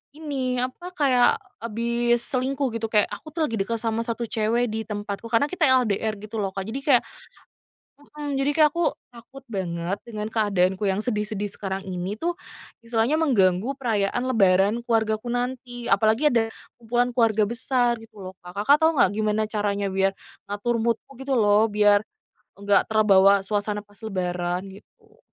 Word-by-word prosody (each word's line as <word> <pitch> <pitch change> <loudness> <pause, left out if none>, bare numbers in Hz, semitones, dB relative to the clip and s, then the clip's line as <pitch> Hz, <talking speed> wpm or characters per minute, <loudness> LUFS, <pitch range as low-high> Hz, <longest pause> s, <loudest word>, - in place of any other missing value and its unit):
ini, 270 -5 -3
apa, 260 +8 -5
kayak 255 -5 +4 0.3
habis 235 +1 0
selingkuh, 265 +1 0
gitu. 225 0 -2
Kayak, 210 -2 +3
"Aku 310 - -8
tuh 325 - -1
lagi - - -7
dekat 230 +4 -1
sama 225 0 -1
1 230 0 -3
cewek 225 +2 +1
di 220 +1 -2
tempatku." 205 0 -5
Karena 235 +4 +3
kita 365 -2 +1 0.2
LDR 215 0 -1
gitu 215 +2 -7
lo, 195 - -1
Kak. 195 -1 -3
Jadi 235 +5 -4
kayak 260 -5 +5 0.9
mhm. 290 -1 -6
Jadi 275 +1 +2
kayak 310 -1 +6
aku 340 0 +1 0.2
takut 245 +3 -14
banget 180 -3 -3
dengan 215 -2 -5
keadaanku 200 -3 +1
yang 190 +1 0
sedih-sedih 210 -2 -2
sekarang 195 -1 -4
ini 185 +2 -4
tuh, 345 +1 -1 0.5
istilahnya 230 +5 +1
mengganggu 210 - +2
perayaan 220 -4 0
lebaran 195 -3 +3
keluargaku 220 -1 0
nanti. 245 -1 -4
Apalagi 220 +8 +3
ada 230 -3 +2 0.3
kumpulan 240 +1 +1
keluarga 220 -3 +3
besar, 245 0 +1
gitu 220 -2 -15
lo, 185 - -6
Kak. 180 +1 -11
Kakak 285 +6 +6
tahu 320 - +6
enggak, 185 - +5
gimana 215 0 0
caranya 205 -2 -1
biar 195 0 +2 0.4
ngatur 205 +4 -1
mood-ku, 230 +2 -1
gitu 270 +1 -3
lo, 210 +1 +4
biar 205 -1 +4 0.6
enggak 200 0 +2
terbawa 200 -2 +5
suasana 205 0 -2
pas 205 -1 -21
lebaran, 180 -3 -2
gitu? 200 - -19
220 Hz, 160 wpm, -24 LUFS, 200-245 Hz, 0.9 s, kayak